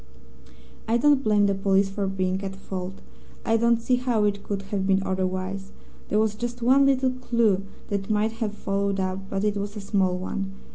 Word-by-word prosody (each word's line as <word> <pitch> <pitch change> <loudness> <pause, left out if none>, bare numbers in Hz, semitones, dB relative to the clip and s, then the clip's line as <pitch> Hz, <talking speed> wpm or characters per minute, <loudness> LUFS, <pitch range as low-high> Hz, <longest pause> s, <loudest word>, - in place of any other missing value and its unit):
"I 230 +1 +3
don't 285 +2 +4
blame 210 -1 +4
the 200 - +2
police 195 0 +2
for 195 0 -2
being 190 0 -1
at 195 0 -4
fault. 190 -1 -6 0.5
I 225 - +3
don't 235 0 +3
see 250 +2 +1
how 245 -4 +1
it 205 -1 0
could 200 -1 -4
have 190 -1 0
been 195 0 +3
otherwise. 185 +1 -2 0.4
There 210 - +1
was 215 -1 +2
just 240 +2 -5
one 270 +3 +5
little 260 -1 +3
clue 235 -6 +1 0.2
that 200 -1 -1
they - - -15
might 215 +1 +2
have 210 -2 -1
followed 200 -1 -1
up, 185 0 -1
but 195 0 -2
it 210 -1 +1
was 205 +1 -4
a - - -4
small 190 -2 +1
one. 195 +1 -4
200 Hz, 200 wpm, -25 LUFS, 195-225 Hz, 0.5 s, one